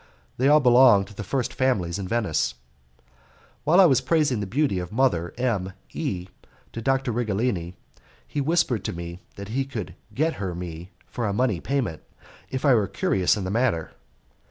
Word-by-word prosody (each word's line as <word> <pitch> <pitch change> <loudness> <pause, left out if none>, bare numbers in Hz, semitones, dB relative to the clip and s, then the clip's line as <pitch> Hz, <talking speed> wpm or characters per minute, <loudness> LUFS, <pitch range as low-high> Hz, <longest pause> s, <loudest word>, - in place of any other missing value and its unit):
They 130 - +2
all 150 +1 +7
belong 125 -6 +6
to 100 - -14
the 105 0 -6
first 125 +5 -2
families 100 -9 0
in 95 - -4
Venice. 85 - 0 1.1
While 165 +5 +5
I 190 - +9
was 135 -6 +4
praising 140 -3 +1
the 100 - -3
beauty 130 -3 +1
of 90 -1 -6
Mother 110 -9 +1
M 105 -7 -1 0.2
E 95 - -3 0.5
to 115 - -5
Dr. 135 +1 +1
Righelini, 105 -6 -1 0.5
he 145 - -2
whispered 145 - +1
to - - -2
me 85 0 -7 0.2
that 100 0 -8
he 135 +5 0
could 125 -7 -6 0.2
get 155 +9 0
her 90 -3 -3
me 85 0 -7 0.2
for 120 -3 -3
a 100 - -1
money 110 -4 +1
payment, 125 - -2 0.5
if 130 +2 -3
I 140 - +6
were 105 -4 +3
curious 95 0 +1
in 100 - -3
the 95 - -3
matter. 110 -8 0
115 Hz, 180 wpm, -25 LUFS, 95-130 Hz, 1.1 s, I